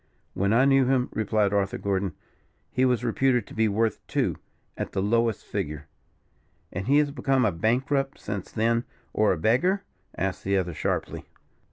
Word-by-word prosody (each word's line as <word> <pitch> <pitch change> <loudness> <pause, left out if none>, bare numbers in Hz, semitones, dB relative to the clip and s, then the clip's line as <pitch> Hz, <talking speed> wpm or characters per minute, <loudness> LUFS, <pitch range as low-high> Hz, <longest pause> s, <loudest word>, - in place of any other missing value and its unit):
"When 100 +2 0
I 120 +4 +5
knew 135 -1 +5
him," 130 -1 +2
replied 105 -2 +1
Arthur 100 -1 0
Gordon, 95 -2 -1 0.6
"he 130 - +2
was 125 -2 +1
reputed 125 -1 +2
to - - -13
be 110 0 +2
worth 110 +1 0
two, - - 0 0.4
at - - -5
the - - -1
lowest 115 +2 +1
figure." 75 0 -4 0.9
"And 95 +2 -4
has 145 +2 +4
he - - -9
become 135 -3 +2
a 105 - +3
bankrupt 135 - 0
since 100 -3 -5
then, 115 +1 +1 0.3
or 110 - +3
a 90 - 0
beggar?" 145 - +2 0.3
asked 95 -1 -2
the 100 0 +1
other, 90 -2 -1
sharply. - - -2
110 Hz, 170 wpm, -26 LUFS, 100-130 Hz, 0.9 s, I